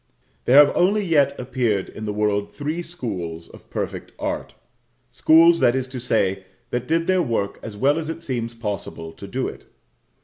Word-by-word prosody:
There 130 - +5
have 145 -1 +7
only 200 +3 +3
yet 145 -5 +2
appeared 125 -6 0
in 110 - -8
the 105 - -2
world 105 -1 -1
three 155 +4 -3
schools 95 - -5
of - - -16
perfect - - -5
art - - -4 0.6
schools, 165 +6 +6
that 120 - +4
is 130 -1 -1
to 130 -1 -6
say, 95 -5 0 0.3
that 125 0 -2
did 165 +1 +1
their 185 0 +3
work 115 -9 -1
as 105 -2 -8
well 145 +8 +3
as 160 -1 -5
it 165 +1 -6
seems 120 -5 -3
possible 100 -7 -5
to 100 - -10
do 130 +6 -2
it. - - -9
125 Hz, 180 wpm, -23 LUFS, 105-155 Hz, 0.6 s, have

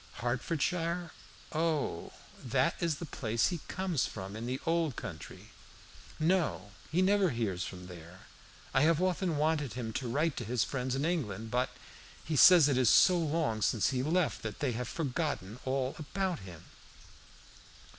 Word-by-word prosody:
"Hertfordshire? 165 - -1 0.4
O, 155 - -1 0.3
that 130 +6 +2
is 170 -3 0
the 170 - -6
place 115 -6 0
he 175 - -3
comes 180 -6 -1
from 95 0 -7
in 115 +2 -5
the 130 +2 -2
Old 165 -5 +1
Country. 90 -9 -8 0.7
No, 155 - +1 0.2
he 180 +4 +3
never 195 -1 +3
hears 105 - -2
from 90 -1 -8
there. 90 0 -11 0.5
I 130 - +4
have 160 +1 +4
often 180 -3 0
wanted 150 -5 0
him 115 -2 -4
to 125 0 -3
write 150 +5 +1
to - - -3
his 120 +1 0
friends 130 -1 -2
in 140 +3 -1
England, 115 - -2
but 125 +1 +1 0.6
he 155 - -2
says 170 +1 +8
it 135 -3 +2
is 125 - +4
so 185 - +6
long 155 -9 0
since 110 +4 +2
he 130 -1 0
left 165 +4 0
that 110 -2 -5
they 140 -4 0
have 120 +2 -3
forgotten 140 - -3
all 130 0 -1
about 180 +3 -2
him." 90 -4 -11
135 Hz, 160 wpm, -31 LUFS, 115-165 Hz, 0.7 s, says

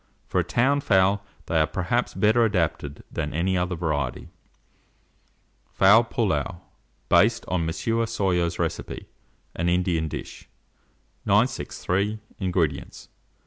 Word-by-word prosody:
For - - 0
a - - +2
town 140 +4 +2
fowl, 100 -2 +3 0.2
they 80 - +1
are 80 - +3
perhaps 95 +9 -1
better 110 +2 +3
adapted 85 -8 -1
than 75 0 -3
any 95 +3 +1
other 90 0 -1
variety. 80 -4 -2 1.4
FOWL 105 +5 +6
PILLAU, 90 -7 -1 0.5
based - - +3
on 85 -2 -1
M. - - -1 0.4
Soyer's 90 -7 0
Recipe - - -3 0.5
(an 85 +1 0
Indian 85 -3 +1
Dish). - - -8 0.8
963. 100 +4 0 0.2
INGREDIENTS. 90 -7 -2
90 Hz, 110 wpm, -25 LUFS, 80-105 Hz, 1.4 s, FOWL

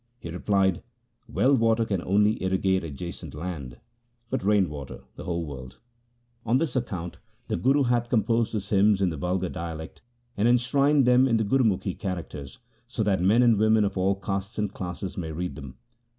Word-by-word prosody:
He 85 - -8
replied, 95 0 +1 0.3
' - - -49
Well 135 +3 +3
water 115 -2 +3
can 100 -5 -1
only 105 +4 +2
irrigate 95 0 +1
adjacent 80 +2 -7
land, 75 -6 -6 0.5
but 130 - -1
rain 100 -2 +3
water 70 -4 -8
the - - -9
whole 85 -1 -2
world. 65 -3 -9 0.7
On 115 +3 +2
this 155 -2 -1
no 130 - +2
THE 120 - -13
SIKH - - -19
RELIGION 95 - -2
account 85 +1 -7 0.3
the - - 0
Guru 140 +3 +3
hath 120 -1 +1
composed 115 0 +1
his 105 -2 -3
hymns 100 0 +4
in 90 - +2
the 80 - -5
vulgar 90 +3 -1
dialect, 80 -2 -7 0.3
and 105 +3 +2
enshrined 135 +3 +3
them 125 +1 +5
in 115 -3 +2
the 110 - +1
Gurumukhi 105 -5 +1
characters, 90 - -5 0.3
so 125 -3 -2
that 95 -3 +1
men 105 +7 +4
and 115 -4 +4
women 110 0 +4
of 100 - -2
all 95 +1 +2
castes 100 +2 -4
and 105 -2 -1
classes 90 0 -5
may 80 -2 -4
read 85 0 -4
them.' 70 -3 -9
100 Hz, 195 wpm, -26 LUFS, 90-115 Hz, 0.7 s, them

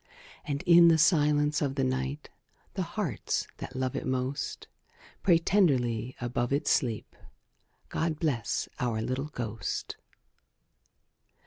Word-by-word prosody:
And, 140 -1 -3
in 170 0 +7
the 165 -1 +6
silence 150 -2 +3
of 140 -2 -1
the 135 - 0
night, 135 +3 -2 0.4
The 195 - -2
hearts 170 - -2
that - - -8
love 130 -1 -2
it - - -3
most 130 +2 -2 0.6
Pray 175 -3 +5
tenderly 130 - +1
above 120 0 -2
its 145 +2 +1
sleep, 115 -6 0 0.7
"God 160 -2 -1
bless 135 -10 -1
our 120 -4 0
little 130 +5 -2
ghost!" 115 -6 -4
140 Hz, 120 wpm, -29 LUFS, 125-155 Hz, 0.7 s, in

